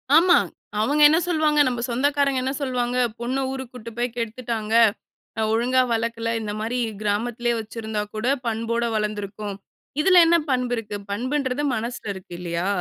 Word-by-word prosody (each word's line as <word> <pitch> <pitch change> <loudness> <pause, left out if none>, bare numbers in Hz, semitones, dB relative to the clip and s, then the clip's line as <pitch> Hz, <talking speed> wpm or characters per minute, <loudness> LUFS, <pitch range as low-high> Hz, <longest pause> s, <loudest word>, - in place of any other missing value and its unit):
ஆமா. 350 +2 +7 0.4
அவங்க 285 +7 +2
என்ன 315 +2 +4
சொல்வாங்க? 310 -3 +2
நம்ம 245 -2 -1
சொந்தக்காரங்க 275 +2 +1
என்ன 265 +1 -1
சொல்வாங்க? 250 -2 -1 0.2
"பொண்ண 245 +3 -2
ஊருக்கு 265 -2 -6
கூட்டிட்டு 230 -2 -10
போய் 240 -1 -1
கெடுத்துட்டாங்க. 230 -1 -3 0.7
அ - - +1
ஒழுங்கா 250 +3 +3
வளக்கல. 230 0 -1
இந்த 210 -1 -4
மாரி 230 +3 -2 0.2
கிராமத்திலேயே 235 +3 0
வச்சிருந்தா 220 -1 -4
கூட 215 +3 -2 0.2
பண்போட 230 +1 -1
வளர்ந்துருக்கும்." 210 -1 -3 0.5
இதில 365 +2 +6
என்ன 340 +1 +5
பண்பு 250 -2 +1
இருக்கு? 220 -3 -5 0.2
பண்புன்றது 260 +5 -1
மனசில 230 -2 -4
இருக்கு, 190 -1 -11
இல்லையா? 170 +1 -2
235 Hz, 145 wpm, -23 LUFS, 220-260 Hz, 0.7 s, ஆமா